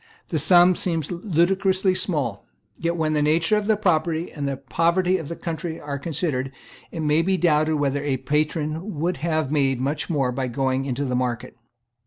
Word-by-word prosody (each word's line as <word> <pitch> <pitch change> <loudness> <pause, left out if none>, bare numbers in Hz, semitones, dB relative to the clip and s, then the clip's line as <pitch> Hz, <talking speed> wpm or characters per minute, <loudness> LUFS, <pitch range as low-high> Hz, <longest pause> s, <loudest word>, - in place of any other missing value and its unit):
The 160 - 0
sum 175 +4 +6
seems 165 -4 -1
ludicrously 185 +2 +1
small. 160 - -1 0.3
Yet, 170 0 -2
when 155 -1 0
the 150 - +1
nature 165 +6 +2
of 210 -1 -1
the 220 -1 +3
property 170 -4 0
and 145 -2 -4
the 135 -1 -2
poverty 170 +7 +1
of 160 - -7
the 170 - -5
country 165 0 -5
are 140 -1 -5
considered, 140 -4 -2 0.4
it 165 - -5
may 150 +1 +2
be 190 +2 +1
doubted 155 -2 +2
whether 145 -1 0
a 140 -2 0
patron 155 - -2
would 170 +4 -1
have 155 -3 -1
made 135 -4 +1
much 140 +2 -2
more 135 -6 +1
by 130 +1 -2
going 130 +1 -1
into 135 +1 -2
the 125 -2 -1
market. 125 -2 -2
155 Hz, 185 wpm, -23 LUFS, 140-175 Hz, 0.4 s, sum